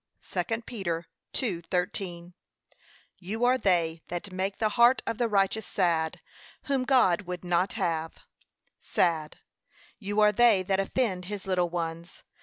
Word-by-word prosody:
(2 230 0 -2
Peter 175 -8 -4 0.3
2:13) 180 -3 -3 0.9
You 215 +6 -1
are 255 +1 +3
they 170 -5 +1
that 175 +3 -5
make 190 +2 -2
the 215 - +1
heart 240 +4 +4
of 230 - -3
the 240 - +2
righteous 205 +1 +1
sad, 165 -4 0 0.4
whom 270 -3 0
God 205 -9 +3
would 180 0 -5
not 180 +2 +1
have, 165 -1 -2 0.7
sad; 160 -3 0 0.6
you 205 0 -2
are 210 0 +6
they 210 -3 +4
that 190 +1 0
offend 195 -3 -1
his 205 0 -6
little 180 -2 +1
ones. 170 0 -5
190 Hz, 135 wpm, -28 LUFS, 175-215 Hz, 0.9 s, are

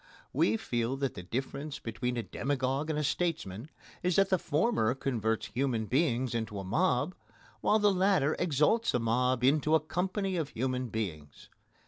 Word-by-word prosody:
We 110 +2 +3
feel 120 +3 -1
that 135 -1 -1
the - - -7
difference 135 +9 -4
between 120 +2 -3
a 115 - -1
demagogue 135 +6 -1
and 155 - 0
a 150 - 0
statesman 145 - -2 0.3
is 180 -1 +1
that 195 0 +4
the 185 - +3
former 150 - +1
converts 110 -6 -1
human 120 -3 0
beings 130 -1 +1
into 110 -3 -3
a 100 - -4
mob, 145 - +1 0.5
while 215 - +3
the 205 -2 +4
latter 185 -6 +3
exalts 175 - +2
a - - +2
mob 125 +2 +1
into 150 +4 +4
a - - +5
company 185 +4 -2
of 155 -4 -2
human 130 +1 -2
beings. 80 -10 -5
135 Hz, 165 wpm, -30 LUFS, 115-160 Hz, 0.5 s, a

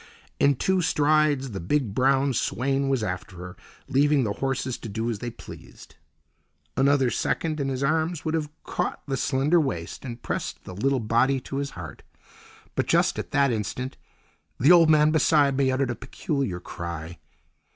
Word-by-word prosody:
In 140 0 +4
two 190 +7 +1
strides 150 -4 +2
the 95 - -5
big, 115 - -1
brown 135 +2 +2
swain 135 +3 0
was 130 -5 +1
after 95 -2 -5
her, 90 +1 -8 0.3
leaving 140 +1 +3
the 105 -3 -1
horses 130 0 -2
to 115 - -7
do 110 +3 -2
as 105 - -5
they 120 - -4
pleased. 115 - -13 0.8
Another 135 -2 +3
second 155 -2 -1
and 140 -1 -1
his 130 0 -2
arms 160 +2 0
would 160 - -1
have 155 -2 -1
caught - - -3
the 135 - -2
slender 145 +6 +2
waist 85 - -4
and 120 -3 -7
pressed - - -4
the 95 - -9
little 135 +8 +1
body 120 +4 +2
to 135 - -6
his 140 0 -2
heart. 80 -4 -8 0.7
But, - - -1
just - - +2
at - - -5
that 140 -2 +2
instant, 120 +5 -4 0.6
the 140 +7 +6
old 170 -2 +7
man 155 0 +5
beside 150 -3 +3
me 135 -1 +2
uttered 130 -1 0
a - - -3
peculiar 130 - -3
cry. 85 -1 -7
135 Hz, 170 wpm, -25 LUFS, 115-145 Hz, 0.8 s, old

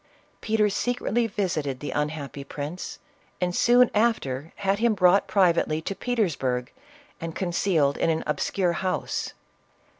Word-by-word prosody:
Peter 215 -1 +2
secretly 240 +2 0
visited 160 - -2
the 145 - -5
un 150 0 0
happy 145 -2 -7
prince, 145 +5 -6 0.4
and 180 -1 -1
soon 245 +1 +5
after 165 - 0
had 200 0 0
him 230 -1 +3
brought 185 +1 +4
privately 175 -5 +2
to 160 - -4
Petersburg 155 - -1 0.5
and 165 -1 -5
concealed 170 -5 +1
in - - +1
an 160 -1 0
obscure 175 +4 0
house. 185 +2 -2
180 Hz, 130 wpm, -25 LUFS, 150-205 Hz, 0.5 s, soon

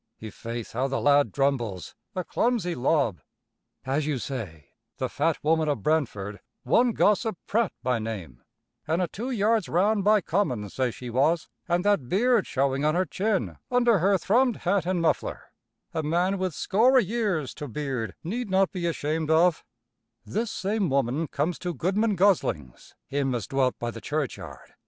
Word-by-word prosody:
I' 110 -1 -8
faith, 115 +1 -6
how 130 +4 0
the 135 0 -1
lad 145 0 +4
drumbles, 125 -9 -1 0.2
a 185 - -1
clumsy 220 -4 0
lob 130 - +1 0.6
"As 140 +3 0
you 150 -3 0
say, 100 - -6 0.3
the - - -1
fat 160 +2 0
woman 160 0 +2
of 140 -9 -2
Brentford, 105 -10 -1 0.2
one 240 -1 +3
Gossip 210 -1 +2
Pratt 225 -2 +1
by 125 -2 +1
name, 95 - -6 0.5
an' 160 +3 +1
a 180 - +1
two 235 +9 -5
yards 220 -4 +1
round 200 +4 +2
by 210 +1 +5
common 145 - -1
say 130 -2 0
she 120 +1 -8
was, 155 +7 +1 0.2
an' 175 +1 +2
that 200 -12 +1
beard 235 +2 +3
showing 135 0 0
on 155 +1 +2
her 185 +1 +2
chin 205 +1 -1
under 240 -4 +3
her 195 +3 +3
thrummed 235 +7 +2
hat 180 0 +1
an' 185 -2 0
muffler, 165 - -1 0.4
a 160 - -1
man 175 +5 0
with 185 -4 -2
score 230 +7 +3
o' - - +8
years 205 - -1
to 150 - -7
beard 130 -3 -4
need 225 +6 -3
not 190 0 +3
be 180 -3 -2
ashamed 155 -1 -2
of 165 +1 +3 0.6
this 225 +2 -2
same 200 -2 -1
woman 140 +3 0
comes 155 +6 -2
to 175 -2 -4
Goodman 200 - +1
Gosling's, 170 - 0
him 135 -2 -1
as 115 -5 -3
dwelt 135 -2 0
by 120 0 -3
the 115 - -9
churchyard. 150 -3 -5
160 Hz, 170 wpm, -26 LUFS, 130-200 Hz, 0.6 s, o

